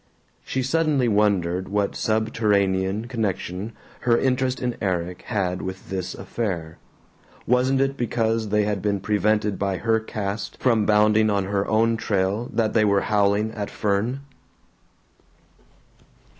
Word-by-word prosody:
She 130 - -2
suddenly 145 -2 +1
wondered 95 -4 +1
what 100 0 0
subterranean 105 -2 +1
connection 105 -3 -3 0.3
her 120 -1 +3
interest 130 0 0
in 125 -2 -2
Erik 90 -3 -2
had 95 -5 -1
with 95 0 -7
this 95 -2 -3
affair. 90 -5 -4 0.7
Wasn't 125 +2 +2
it 135 0 +1
because 115 -2 0
they 105 +1 +2
had 105 -2 -1
been 100 0 0
prevented 105 0 +1
by 100 -2 0
her 110 +5 +1
caste 105 -1 -4
from 115 -5 +2
bounding 105 +1 +4
on 100 -2 +1
her 100 0 -1
own 115 +1 +2
trail 100 +2 -1
that 110 -2 0
they 110 - +4
were 100 -2 +3
howling 105 +1 +1
at 105 -2 -5
Fern? 105 +6 -1
105 Hz, 130 wpm, -23 LUFS, 100-115 Hz, 0.7 s, bounding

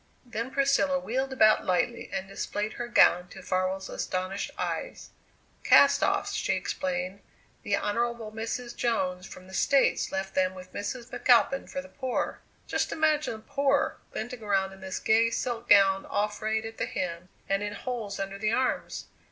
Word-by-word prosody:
Then 235 0 -4
Priscilla 275 +1 +2
wheeled 265 0 -2
about 215 -5 +5
lightly 185 +6 0
and 190 - -3
displayed 205 +2 -3
her 240 - -5
gown 180 -6 +5
to 190 +1 -12
Farwell's 185 +1 -1
astonished 185 +2 -3
eyes. - - -4 0.5
"Cast - - +6
offs," - - +1
she - - 0
explained; 265 -9 -2 0.4
"the 200 - 0
Honourable 230 +1 -1
Mrs. 230 +2 -4
Jones 185 -6 -1
from 185 - -11
the 190 - -14
States 275 +7 +2
left 190 0 -3
them 185 0 +1
with 185 0 -11
Mrs. 235 +4 -5
McAlpin 255 +2 +3
for 275 - -4
the - - -12
poor. 260 -2 -3 0.2
Just - - -1
imagine 310 -3 +1
the - - -10
'poor' 280 +4 +1
glinting 240 +2 -5
around 195 -2 0
in 195 - -14
this 190 -1 -4
gay 225 +1 +3
silk 240 -1 -3
gown 195 -1 +5
all 210 +1 0
frayed 220 +1 -2
at 225 0 -8
the - - 0
hem 175 0 -4 0.2
and 195 0 +1
in 205 0 -3
holes 220 -5 -4
under 195 0 -4
the 215 +1 +1
arms! 255 0 -1
215 Hz, 170 wpm, -28 LUFS, 190-245 Hz, 0.5 s, Cast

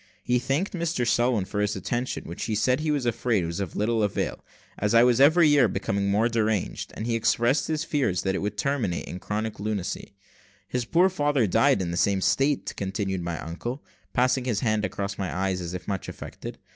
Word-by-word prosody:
He 125 0 +2
thanked 140 +10 -1
Mr 165 -8 -1
Selwin 120 -4 +2
for 105 +1 -4
his 105 0 0
attention, 120 +6 -3
which 85 - -6
he 110 -1 -1
said 125 +4 +2
he 155 0 -2
was 145 -4 0
afraid 115 -5 +1
was 85 +3 -4
of 95 -4 -4
little 110 +2 +1
avail, 105 -2 -1 0.4
as 105 +2 +1
I 115 - +8
was 125 +1 +4
every 160 +3 +6
year 145 -5 +5
becoming 100 0 -1
more 105 +3 +3
deranged; 110 -4 -1
and 110 - -4
he 120 - 0
expressed 120 +4 +2
his 155 0 -1
fears 130 - 0
that 95 - 0
it - - -1
would 105 0 -3
terminate 115 -5 -1
in 90 - -7
chronic 105 +2 -3
lunacy 100 -1 -4 0.5
"His 125 +3 -2
poor 170 +9 +4
father 145 -8 +1
died 95 -1 +3
in 85 - -3
the 85 - -3
same 100 +1 +2
state," 135 +7 +1
continued 95 -1 -2
my 85 -1 -3
uncle, 120 - -5 0.3
passing 125 0 +2
his 120 -5 0
hand 110 -4 +1
across 100 -1 -3
his - - -16
eyes, 95 0 -1
as 85 +1 -5
if 90 - -7
much 100 -2 -3
affected. - - -8
110 Hz, 210 wpm, -26 LUFS, 100-130 Hz, 0.5 s, I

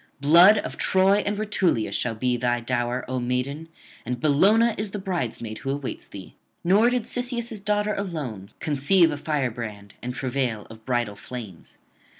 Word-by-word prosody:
Blood 170 +9 +7
of - - -3
Troy 190 +2 +3
and 205 0 -1
Rutulia 190 - +1
shall 115 +3 -1
be 125 +2 0
thy 120 0 0
dower, 120 +1 -2
O 130 0 -2
maiden, 125 +6 -2 0.3
and 125 +1 -3
Bellona 200 - +4
is 210 0 -3
the 205 - -5
bridesmaid 125 - -4
who 135 - -5
awaits 140 -1 -4
thee. 95 -2 -10 0.3
Nor 205 +7 +5
did 250 -2 0
Cisseus' 240 -2 -3
daughter 210 0 +1
alone 145 - -5
conceive 160 +4 +3
a 145 - -3
firebrand 115 -9 -3
and 125 - -4
travail 125 -5 -2
of 110 0 -14
bridal 120 -5 -1
flames. 105 -6 -9
140 Hz, 155 wpm, -25 LUFS, 120-195 Hz, 0.3 s, Blood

